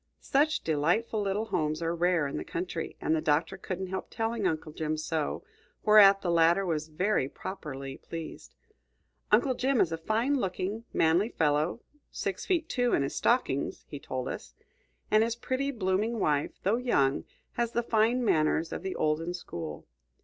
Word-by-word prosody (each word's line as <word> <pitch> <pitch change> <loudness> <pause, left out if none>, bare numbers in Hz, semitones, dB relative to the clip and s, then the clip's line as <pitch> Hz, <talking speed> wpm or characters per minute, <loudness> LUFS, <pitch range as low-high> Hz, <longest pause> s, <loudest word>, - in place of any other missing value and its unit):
Such 300 +3 +2
delightful 175 +9 +1
little 200 +2 -1
homes 155 -7 -1
are 165 0 -1
rare 170 -2 +2
in 140 - -3
the - - -3
country, 170 -1 -4
and 160 - +1
the 155 - 0
Doctor 155 +6 +1
couldn't 190 0 -4
help 190 0 -4
telling 225 -3 -1
Uncle 160 -2 -3
Jim 155 0 -2
so, 155 -1 -2 0.4
whereat 200 -2 +7
the 175 - +1
latter 170 +3 +4
was 160 -3 -1
very 165 -2 0
properly 135 -8 -7
pleased. 165 -1 -8 0.8
Uncle 265 - +4
Jim 260 0 +1
is 165 - +3
a 165 - -3
fine 225 +10 +1
looking, 195 +3 -3
manly 170 +7 +3
fellow, 155 +4 +1 0.3
six 195 -2 -4
feet 340 -4 +1
two 245 -5 +1
in 140 - +3
his 140 - -3
stockings, 235 - 0
he 145 - -6
told 130 -2 -4
us; - - -7 0.6
and 215 +1 +5
his 230 0 -1
pretty, 260 +3 -2
blooming 215 -1 0
wife, 150 -5 0
though 205 +5 +2
young, 140 - +1 0.3
has 235 0 -2
the 235 - +1
fine 230 +2 +2
manners 160 -2 +2
of - - -4
the 190 0 -4
olden 165 +3 0
school. 85 - -7
180 Hz, 170 wpm, -29 LUFS, 155-225 Hz, 0.8 s, whereat